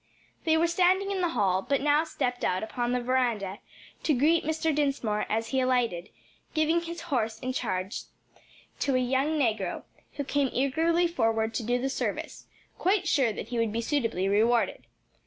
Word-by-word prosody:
They 320 Hz, -1 st, +4 dB
were 330 Hz, -, +3 dB
standing 370 Hz, +3 st, +2 dB
in 385 Hz, -2 st, -1 dB
the 350 Hz, -, +1 dB
hall, 190 Hz, -2 st, +2 dB
but 275 Hz, +7 st, 0 dB
now 295 Hz, +2 st, +3 dB
stepped 250 Hz, -5 st, -3 dB
out 185 Hz, +2 st, 0 dB
upon 240 Hz, +2 st, -2 dB
the 250 Hz, 0 st, 0 dB
veranda 235 Hz, -6 st, 0 dB, 0.4 s
to 305 Hz, -, +2 dB
greet 315 Hz, +6 st, +3 dB
Mr. 315 Hz, +1 st, 0 dB
Dinsmore 275 Hz, -8 st, 0 dB
as 225 Hz, +1 st, -1 dB
he 265 Hz, -, +1 dB
alighted, 245 Hz, -9 st, 0 dB, 0.5 s
giving 320 Hz, +2 st, +2 dB
his 335 Hz, 0 st, -6 dB
horse 235 Hz, -9 st, -1 dB
in 255 Hz, +3 st, -4 dB
charge 190 Hz, -5 st, -3 dB, 0.7 s
to 275 Hz, -2 st, +1 dB
a -, -, +3 dB
young 265 Hz, +5 st, +1 dB
negro 220 Hz, -9 st, 0 dB, 0.3 s
who 285 Hz, -, -3 dB
came 280 Hz, -1 st, 0 dB
eagerly 325 Hz, +6 st, +2 dB
forward 225 Hz, -9 st, 0 dB
to 235 Hz, -, -2 dB
do 245 Hz, +2 st, 0 dB
the 265 Hz, -, -1 dB
service, 270 Hz, -, -4 dB, 0.3 s
quite 375 Hz, 0 st, +2 dB
sure 265 Hz, -8 st, +3 dB
that 210 Hz, -, -7 dB
he 240 Hz, -1 st, -2 dB
would 230 Hz, -2 st, +1 dB
be 230 Hz, +2 st, -1 dB
suitably 230 Hz, -8 st, 0 dB
rewarded. 225 Hz, +4 st, +2 dB
255 Hz, 175 wpm, -28 LUFS, 225-315 Hz, 0.7 s, They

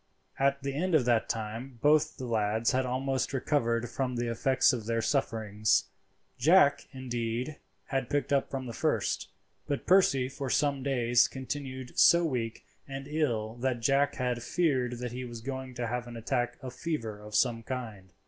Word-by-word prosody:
At 140 Hz, 0 st, +2 dB
the 140 Hz, 0 st, -2 dB
end 170 Hz, +4 st, +1 dB
of 140 Hz, -6 st, +4 dB
that 120 Hz, -2 st, +2 dB
time 115 Hz, +4 st, -4 dB
both 150 Hz, 0 st, +4 dB
the 130 Hz, -, -5 dB
lads 110 Hz, -1 st, +1 dB
had 130 Hz, 0 st, +1 dB
almost 130 Hz, +1 st, -1 dB
recovered 120 Hz, -4 st, 0 dB
from 125 Hz, +2 st, -2 dB
the 120 Hz, 0 st, -1 dB
effects 130 Hz, +4 st, +3 dB
of 115 Hz, -3 st, -4 dB
their 115 Hz, 0 st, +1 dB
sufferings. 110 Hz, -5 st, +1 dB, 0.5 s
Jack, 145 Hz, 0 st, +5 dB
indeed, 125 Hz, +1 st, -3 dB, 0.3 s
had 135 Hz, -3 st, -2 dB
picked 145 Hz, 0 st, 0 dB
up 140 Hz, -, +2 dB
from 130 Hz, -1 st, -4 dB
the 120 Hz, -, -6 dB
first, -, -, -1 dB, 0.4 s
but 145 Hz, -2 st, -2 dB
Percy 175 Hz, -9 st, +4 dB
for 135 Hz, 0 st, -5 dB
some 140 Hz, 0 st, +1 dB
days 120 Hz, -3 st, +3 dB
continued 130 Hz, -1 st, -5 dB
so 170 Hz, 0 st, +7 dB
weak 120 Hz, -7 st, -3 dB, 0.2 s
and 135 Hz, 0 st, -6 dB
ill 120 Hz, -8 st, -1 dB
that 120 Hz, -1 st, -1 dB
Jack 140 Hz, +3 st, +2 dB
had 125 Hz, -2 st, -1 dB
feared 130 Hz, -5 st, +1 dB
that 125 Hz, 0 st, -5 dB
he 125 Hz, +1 st, -5 dB
was 120 Hz, -2 st, -7 dB
going 130 Hz, +1 st, -6 dB
to 120 Hz, -1 st, -2 dB
have 120 Hz, +1 st, -3 dB
an 120 Hz, -1 st, -8 dB
attack 120 Hz, +2 st, -1 dB
of 130 Hz, -1 st, -6 dB
fever 115 Hz, -10 st, -4 dB
of 105 Hz, 0 st, -8 dB
some 115 Hz, +1 st, +2 dB
kind. 110 Hz, -6 st, -6 dB
125 Hz, 175 wpm, -30 LUFS, 115-135 Hz, 0.5 s, so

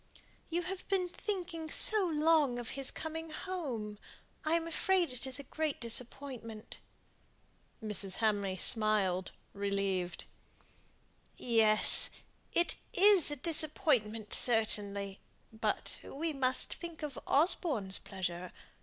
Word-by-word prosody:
"You 345 Hz, +1 st, -2 dB
have 375 Hz, +1 st, -7 dB
been 375 Hz, -2 st, -1 dB
thinking 350 Hz, -5 st, -5 dB
so 420 Hz, +1 st, +6 dB
long 305 Hz, -5 st, +2 dB
of 240 Hz, -2 st, -6 dB
his 275 Hz, -1 st, +2 dB
coming 320 Hz, 0 st, -5 dB
home. 270 Hz, -, -6 dB, 0.4 s
I 315 Hz, +1 st, +1 dB
am 330 Hz, 0 st, -1 dB
afraid 345 Hz, -2 st, 0 dB
it 255 Hz, +2 st, -4 dB
is 260 Hz, -1 st, +5 dB
a 280 Hz, -, -6 dB
great 310 Hz, +2 st, -3 dB
disappointment." 235 Hz, -1 st, -2 dB, 1.0 s
Mrs. 205 Hz, -3 st, -2 dB
Hamley 205 Hz, -4 st, -1 dB
smiled 200 Hz, -4 st, +3 dB, 0.2 s
relieved. 195 Hz, -3 st, -3 dB, 1.1 s
"Yes! 220 Hz, -3 st, +5 dB, 0.4 s
it 345 Hz, -, 0 dB, 0.2 s
is 395 Hz, -5 st, +6 dB
a 295 Hz, -, -2 dB
disappointment 255 Hz, -8 st, 0 dB
certainly, 205 Hz, -4 st, -1 dB, 0.3 s
but 220 Hz, -, -3 dB
we 315 Hz, +3 st, -4 dB
must 260 Hz, -2 st, 0 dB
think 335 Hz, -2 st, -9 dB
of 290 Hz, -3 st, -6 dB
Osborne's 275 Hz, -, +1 dB
pleasure. 180 Hz, -2 st, -6 dB
255 Hz, 110 wpm, -32 LUFS, 210-325 Hz, 1.1 s, so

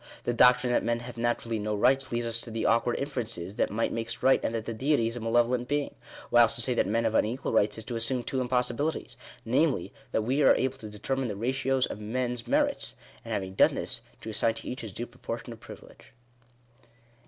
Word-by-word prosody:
The 120 Hz, -, 0 dB
doctrine 125 Hz, 0 st, +5 dB
that -, -, +2 dB
men 120 Hz, 0 st, 0 dB
have 120 Hz, 0 st, -8 dB
naturally 115 Hz, -1 st, 0 dB
no 105 Hz, 0 st, -1 dB
rights 135 Hz, +6 st, +2 dB
leads 115 Hz, -1 st, -1 dB
to -, -, -6 dB
the 115 Hz, 0 st, -3 dB
awkward 115 Hz, +1 st, +3 dB
inferences, 115 Hz, -10 st, -3 dB
that -, -, +2 dB
might 115 Hz, +2 st, -1 dB
makes 115 Hz, +1 st, -4 dB
right, 135 Hz, -, +5 dB
and 115 Hz, -, -1 dB
that 110 Hz, -1 st, -3 dB
the 115 Hz, -, -3 dB
Deity 135 Hz, +1 st, +1 dB
is 115 Hz, +1 st, -2 dB
a -, -, -4 dB
malevolent 120 Hz, +2 st, +1 dB
being. 145 Hz, +1 st, -1 dB, 0.4 s
Whilst 120 Hz, -2 st, +6 dB
to -, -, +1 dB
say 125 Hz, -, +2 dB
that 120 Hz, -, +1 dB
men 115 Hz, +3 st, +1 dB
have 110 Hz, -1 st, +1 dB
unequal 115 Hz, +4 st, 0 dB
rights 105 Hz, -1 st, +2 dB
is 110 Hz, -, -5 dB
to 120 Hz, +2 st, -5 dB
assume 120 Hz, +2 st, 0 dB
two 130 Hz, +2 st, -2 dB
impossibilities; 125 Hz, +2 st, -1 dB, 0.3 s
namely, 125 Hz, -, +1 dB, 0.2 s
that 110 Hz, -, +1 dB
we 130 Hz, +6 st, +1 dB
are -, -, +6 dB
able 130 Hz, +1 st, -1 dB
to 110 Hz, -, -8 dB
determine 130 Hz, +5 st, -2 dB
the 105 Hz, -, -3 dB
ratios 130 Hz, +4 st, +1 dB
of -, -, -7 dB
men's 120 Hz, +2 st, -3 dB
merits; -, -, +1 dB, 0.3 s
and -, -, -8 dB
having 95 Hz, -1 st, -2 dB
done -, -, +4 dB
this, -, -, -3 dB, 0.2 s
to 110 Hz, -, -6 dB
assign 115 Hz, +1 st, +1 dB
to -, -, -9 dB
each 125 Hz, -, -4 dB
his 110 Hz, -3 st, -7 dB
due 120 Hz, +5 st, -5 dB
proportion -, -, -7 dB
of -, -, -14 dB
privilege. -, -, -14 dB
120 Hz, 220 wpm, -28 LUFS, 115-125 Hz, 0.4 s, Whilst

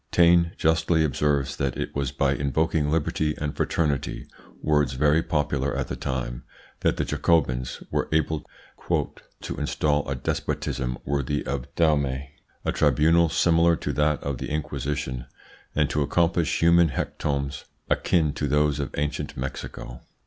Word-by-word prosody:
Taine 85 Hz, 0 st, +4 dB
justly 80 Hz, 0 st, +2 dB
observes 70 Hz, -2 st, 0 dB
that 70 Hz, -3 st, -1 dB
it -, -, -4 dB
was 70 Hz, -2 st, -1 dB
by 70 Hz, 0 st, +1 dB
invoking 75 Hz, +2 st, 0 dB
liberty 75 Hz, -1 st, 0 dB
and 75 Hz, -1 st, -3 dB
fraternity 75 Hz, -4 st, -1 dB, 0.3 s
words 75 Hz, -3 st, +2 dB
very 75 Hz, +4 st, +3 dB
popular 75 Hz, -3 st, -1 dB
at 70 Hz, -2 st, -2 dB
the -, -, -3 dB
time 60 Hz, -2 st, -3 dB, 0.4 s
that -, -, +1 dB
the -, -, 0 dB
Jacobins 65 Hz, -7 st, 0 dB
were -, -, -1 dB
able 80 Hz, -1 st, +1 dB, 1.0 s
"to -, -, -5 dB
install 75 Hz, -2 st, 0 dB
a 70 Hz, -, -1 dB
despotism 65 Hz, 0 st, -2 dB
worthy 70 Hz, 0 st, -1 dB
of 70 Hz, -3 st, -3 dB
Dahomey, 70 Hz, -4 st, +1 dB, 0.3 s
a -, -, +1 dB
tribunal 85 Hz, +2 st, +4 dB
similar 85 Hz, +1 st, +4 dB
to -, -, -3 dB
that 75 Hz, 0 st, +1 dB
of 70 Hz, -3 st, -3 dB
the -, -, -4 dB
Inquisition, 70 Hz, -4 st, -3 dB, 0.5 s
and 75 Hz, -1 st, +3 dB
to 75 Hz, -, 0 dB
accomplish 85 Hz, +2 st, +1 dB
human 85 Hz, 0 st, +6 dB
hecatombs 70 Hz, 0 st, -3 dB, 0.2 s
akin 80 Hz, -4 st, +2 dB
to 75 Hz, -, -2 dB
those 75 Hz, +1 st, +2 dB
of 70 Hz, -, -2 dB
ancient 75 Hz, 0 st, -2 dB
Mexico." 65 Hz, -1 st, -6 dB
75 Hz, 140 wpm, -25 LUFS, 70-80 Hz, 1.0 s, human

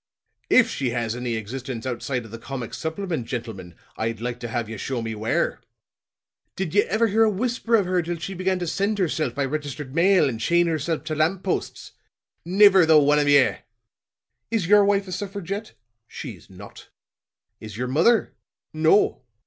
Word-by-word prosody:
If -, -, +6 dB
she 130 Hz, -, -2 dB
has 115 Hz, -1 st, -2 dB
any 125 Hz, -1 st, -3 dB
existence 120 Hz, +2 st, -6 dB
outside 125 Hz, -1 st, -3 dB
of 110 Hz, -, -13 dB
the 115 Hz, -, -8 dB
comic 125 Hz, -2 st, -6 dB
supplement, 160 Hz, -6 st, -4 dB
gentlemen, 110 Hz, -9 st, -6 dB, 0.2 s
I'd 115 Hz, 0 st, -2 dB
like 120 Hz, +1 st, -4 dB
to 120 Hz, -, -5 dB
have 115 Hz, -1 st, -3 dB
ye 110 Hz, -, -6 dB
show 130 Hz, +4 st, -3 dB
me 115 Hz, 0 st, -4 dB
where. 110 Hz, +1 st, -1 dB, 0.9 s
Did 185 Hz, -4 st, -3 dB
ye 205 Hz, -, +5 dB
ever 220 Hz, +3 st, +1 dB
hear 220 Hz, +1 st, +1 dB
a 220 Hz, -, +4 dB
whisper 235 Hz, +2 st, 0 dB
of 205 Hz, -4 st, +3 dB
her 180 Hz, 0 st, +1 dB
till 170 Hz, +1 st, -4 dB
she 180 Hz, +4 st, -6 dB
began 185 Hz, +1 st, -1 dB
to 180 Hz, -, -3 dB
send 200 Hz, +5 st, -1 dB
herself 155 Hz, -8 st, -1 dB
by 140 Hz, -, 0 dB
registered 145 Hz, -2 st, -5 dB
mail 175 Hz, 0 st, +4 dB
and 115 Hz, -4 st, -3 dB
chain 170 Hz, +9 st, +2 dB
herself 160 Hz, -1 st, -2 dB
to 155 Hz, -, -4 dB
lamp 160 Hz, +5 st, 0 dB
posts? 190 Hz, -, -3 dB, 0.5 s
Niver 190 Hz, +1 st, +6 dB
the 160 Hz, -1 st, +7 dB
one 150 Hz, 0 st, +4 dB
of 145 Hz, -1 st, +2 dB
ye! 140 Hz, -2 st, +4 dB, 0.9 s
Is 225 Hz, -6 st, 0 dB
your 205 Hz, +3 st, +6 dB
wife 200 Hz, 0 st, +1 dB
a -, -, -7 dB
suffragette? 200 Hz, +2 st, -5 dB, 0.3 s
She's -, -, -9 dB
not. -, -, -13 dB, 0.7 s
Is 110 Hz, -1 st, -9 dB
your 125 Hz, +1 st, -2 dB
mother? 170 Hz, -, +2 dB, 0.4 s
No. 160 Hz, +3 st, +3 dB
155 Hz, 180 wpm, -24 LUFS, 125-190 Hz, 0.9 s, the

